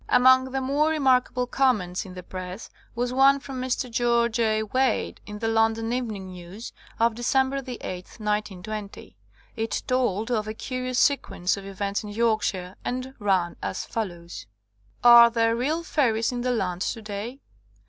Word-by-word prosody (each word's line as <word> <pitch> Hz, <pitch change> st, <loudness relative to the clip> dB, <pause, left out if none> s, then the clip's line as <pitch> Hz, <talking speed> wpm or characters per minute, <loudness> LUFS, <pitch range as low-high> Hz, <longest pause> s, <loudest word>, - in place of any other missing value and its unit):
Among 260 Hz, +1 st, +5 dB
the 270 Hz, 0 st, -1 dB
more 285 Hz, +4 st, +2 dB
remarkable 260 Hz, -4 st, +2 dB
comments 215 Hz, -10 st, +1 dB
in 185 Hz, -, -10 dB
the 180 Hz, -, -8 dB
press 185 Hz, +3 st, -7 dB, 0.2 s
was 245 Hz, +1 st, -1 dB
one 275 Hz, +1 st, +5 dB
from 265 Hz, -1 st, -6 dB
Mr. 255 Hz, 0 st, -1 dB
George 235 Hz, 0 st, +1 dB
A. 220 Hz, -1 st, +2 dB
Wade 255 Hz, +5 st, 0 dB
in 210 Hz, 0 st, -6 dB
the 225 Hz, -, -2 dB
London 225 Hz, +1 st, +1 dB
Evening 210 Hz, -7 st, -4 dB
Netus 180 Hz, +6 st, -9 dB, 0.3 s
of 230 Hz, 0 st, +3 dB
December 265 Hz, +3 st, +1 dB
8, 250 Hz, -2 st, -5 dB
1920. 210 Hz, +1 st, -5 dB, 0.4 s
It 225 Hz, -1 st, -2 dB
told 245 Hz, -3 st, 0 dB
of 215 Hz, -3 st, 0 dB
a 215 Hz, -, -4 dB
curious 255 Hz, +1 st, -3 dB
sequence 230 Hz, -10 st, +1 dB
of 195 Hz, -1 st, -9 dB
events 200 Hz, +1 st, -2 dB
in 210 Hz, -, -7 dB
Yorkshire, 205 Hz, -4 st, 0 dB
and 255 Hz, +1 st, -4 dB
ran 190 Hz, -4 st, +1 dB
as -, -, -3 dB
follows: 175 Hz, -, -5 dB, 0.6 s
Are 235 Hz, -1 st, +9 dB
there 230 Hz, -1 st, +2 dB
real 300 Hz, +8 st, -1 dB
fairies 235 Hz, -9 st, +1 dB
in 245 Hz, -1 st, -3 dB
the 250 Hz, -, -1 dB
land 185 Hz, -6 st, -1 dB
to 225 Hz, -, -2 dB
day? 210 Hz, +5 st, -6 dB
230 Hz, 160 wpm, -25 LUFS, 205-255 Hz, 0.6 s, Are